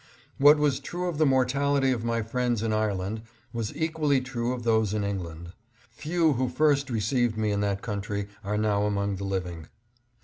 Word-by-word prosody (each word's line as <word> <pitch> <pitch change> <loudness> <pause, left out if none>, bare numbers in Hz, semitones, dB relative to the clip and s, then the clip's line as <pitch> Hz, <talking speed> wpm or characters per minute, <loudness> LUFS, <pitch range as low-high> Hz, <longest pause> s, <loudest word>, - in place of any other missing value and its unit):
What 145 +2 +8
was 145 -3 +1
true 175 +6 -4
of 165 -4 -3
the 155 - +5
mortality 135 +1 +2
of 120 -3 -1
my 115 -1 0
friends 120 -1 -1
in 110 -1 0
Ireland, 105 0 -1 0.3
was 115 -2 -3
equally 160 -3 +1
true 125 -2 -3
of 125 -1 -4
those 110 -2 +2
in 105 - 0
England. 85 -4 -5 0.4
Few 160 0 +1
who 130 0 0
first 140 +1 +2
received 115 0 0
me 110 -1 0
in 100 - 0
that 100 -1 -1
country 100 -2 -3 0.2
are 105 +1 -1
now 105 -1 +1
among 100 -1 -1
the 100 - -4
living. 90 -4 -4
115 Hz, 180 wpm, -27 LUFS, 100-135 Hz, 0.4 s, What